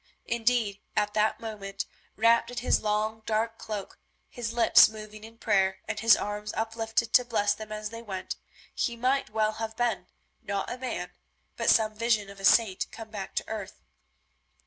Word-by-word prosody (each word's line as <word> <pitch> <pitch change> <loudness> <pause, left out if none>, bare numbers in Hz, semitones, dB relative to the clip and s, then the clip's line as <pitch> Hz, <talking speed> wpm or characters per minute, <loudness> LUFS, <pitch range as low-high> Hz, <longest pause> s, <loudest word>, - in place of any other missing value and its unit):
Indeed, 230 -3 0
at 210 0 +1
that 215 0 +2
moment, 200 -3 -5 0.3
wrapped 230 +2 +4
in 245 - -8
his 245 - +2
long, 215 +1 0
dark 225 +1 0
cloak, 210 -3 -6 0.3
his 235 -2 -4
lips 235 -2 +7
moving 215 0 -10
in 225 +1 -12
prayer, 190 -4 +2
and - - -3
his 230 +1 +6
arms 210 0 -4
uplifted 225 0 -1
to 250 - +7
bless 210 -4 +1
them 215 -1 -9
as 215 0 -4
they 230 0 -7
went, 195 -5 -5 0.4
he 235 - -1
might 260 +3 +1
well 215 0 +1
have 220 0 -5
been, 230 -7 0 0.3
not 200 -1 -3
a 245 - -4
man, 260 0 -4 0.4
but - - +1
some 215 -1 +4
vision 215 -2 +1
of 200 - -13
a 195 - -3
saint 210 -4 +4
come 225 -1 -10
back 200 -3 -6
to - - -1
earth. 210 -3 -6
220 Hz, 175 wpm, -28 LUFS, 210-230 Hz, 0.4 s, lips